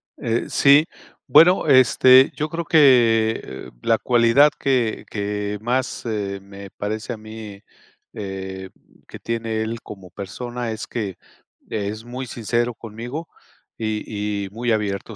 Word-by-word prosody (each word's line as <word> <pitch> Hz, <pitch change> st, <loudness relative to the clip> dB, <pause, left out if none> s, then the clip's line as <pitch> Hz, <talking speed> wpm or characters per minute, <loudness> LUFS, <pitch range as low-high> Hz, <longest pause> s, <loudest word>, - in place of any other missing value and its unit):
Eh, 115 Hz, 0 st, -2 dB
sí, 145 Hz, +2 st, +5 dB, 0.4 s
bueno, 175 Hz, 0 st, +6 dB
este, 130 Hz, 0 st, +6 dB
yo 155 Hz, +1 st, -2 dB
creo 170 Hz, +1 st, -4 dB
que, 120 Hz, -8 st, +4 dB
eh, 65 Hz, -, -9 dB
la 115 Hz, -, +3 dB
cualidad 120 Hz, +5 st, +4 dB
que 125 Hz, -5 st, 0 dB
que 105 Hz, 0 st, -3 dB
más, 125 Hz, +3 st, -2 dB
eh, 100 Hz, -3 st, -3 dB
me 100 Hz, 0 st, -11 dB
parece 110 Hz, +3 st, -4 dB
a -, -, -8 dB
mí, 110 Hz, -2 st, -10 dB, 0.5 s
eh, 95 Hz, -2 st, -6 dB, 0.4 s
que -, -, -11 dB
tiene 115 Hz, -1 st, -3 dB
él 110 Hz, +1 st, -4 dB
como 95 Hz, -3 st, -11 dB
persona, 120 Hz, +6 st, -6 dB
es 110 Hz, 0 st, -6 dB
que 100 Hz, -6 st, -4 dB, 0.5 s
es 105 Hz, +1 st, -4 dB
muy 125 Hz, +2 st, -6 dB
sincero 120 Hz, 0 st, -2 dB
conmigo 120 Hz, +8 st, -7 dB, 0.5 s
y 105 Hz, -2 st, -3 dB
y, -, -, -8 dB
muy 120 Hz, +3 st, -2 dB
abierto. 105 Hz, 0 st, -2 dB
110 Hz, 135 wpm, -22 LUFS, 105-125 Hz, 0.5 s, bueno